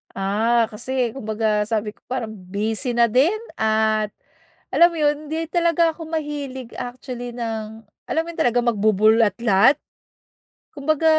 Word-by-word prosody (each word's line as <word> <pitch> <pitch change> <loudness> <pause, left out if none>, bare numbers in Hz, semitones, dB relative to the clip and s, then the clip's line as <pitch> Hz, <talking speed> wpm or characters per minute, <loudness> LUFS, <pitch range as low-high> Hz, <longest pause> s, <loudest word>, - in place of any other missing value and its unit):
Ah, 220 +4 +2
kasi 240 +2 -3
kumbaga 215 -3 0
sabi 210 0 -2
ko, - - -34
parang 245 -4 -4 0.2
busy 220 +5 -1
na 235 0 +4
din, 260 - +3 0.2
at 220 -1 +1 0.6
alam 345 - +7
mo 335 - -6
yun, 295 0 +3
hindi 320 +2 -3
talaga 335 -1 +2
ako 330 - -8
mahilig 285 -6 -4
actually 245 -1 -6
ng 220 -2 -5 0.3
alam - - +1
mo - - -13
yun, - - -14
talaga 245 -6 +3
magbubulatlat? 220 +1 +4 1.0
Kumbaga, 310 +2 0
235 Hz, 135 wpm, -22 LUFS, 220-285 Hz, 1.0 s, alam